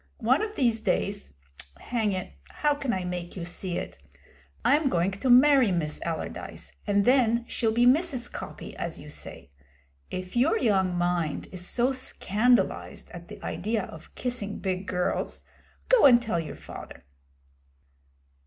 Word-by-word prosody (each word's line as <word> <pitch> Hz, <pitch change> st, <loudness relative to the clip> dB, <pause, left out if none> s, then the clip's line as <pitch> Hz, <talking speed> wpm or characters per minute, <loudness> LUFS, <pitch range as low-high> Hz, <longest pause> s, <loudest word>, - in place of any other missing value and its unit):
One 255 Hz, +6 st, +3 dB
of 430 Hz, 0 st, -3 dB
these 235 Hz, -4 st, +2 dB
days 200 Hz, -, -1 dB, 0.4 s
hang 225 Hz, -4 st, -1 dB
it, 185 Hz, -, -4 dB, 0.2 s
how 295 Hz, -1 st, +1 dB
can 280 Hz, -3 st, -2 dB
I 185 Hz, -4 st, -1 dB
make 180 Hz, -1 st, -5 dB
you 175 Hz, -3 st, -5 dB
see 175 Hz, 0 st, -3 dB
it! -, -, -6 dB, 0.7 s
I'm 290 Hz, 0 st, +4 dB
going 175 Hz, -2 st, +1 dB
to 200 Hz, +7 st, -2 dB
marry 260 Hz, -2 st, +7 dB
Miss 155 Hz, -4 st, -1 dB
Allardyce, 165 Hz, -2 st, -5 dB, 0.2 s
and 200 Hz, -1 st, +3 dB
then 240 Hz, -2 st, +4 dB
she'll 225 Hz, -1 st, 0 dB
be 240 Hz, +2 st, +3 dB
Mrs. 260 Hz, -2 st, +3 dB
Coppy, -, -, -7 dB
as -, -, -4 dB
you -, -, -10 dB
say. -, -, -7 dB, 0.6 s
If 185 Hz, +2 st, -6 dB
your 275 Hz, -, +3 dB
young 190 Hz, -, +2 dB
mind 175 Hz, -3 st, -1 dB
is 180 Hz, -1 st, -4 dB
so 245 Hz, +2 st, +2 dB
scandalised 245 Hz, -2 st, 0 dB
at -, -, -10 dB
the -, -, -10 dB
idea 215 Hz, +2 st, -1 dB
of 160 Hz, -, -11 dB
kissing 240 Hz, -5 st, -1 dB
big 190 Hz, 0 st, -3 dB
girls, 180 Hz, -1 st, -1 dB, 0.4 s
go -, -, +7 dB
and 240 Hz, -3 st, +7 dB
tell 220 Hz, -7 st, -1 dB
your 165 Hz, -, -5 dB
father.' -, -, -11 dB
220 Hz, 155 wpm, -27 LUFS, 185-250 Hz, 0.7 s, marry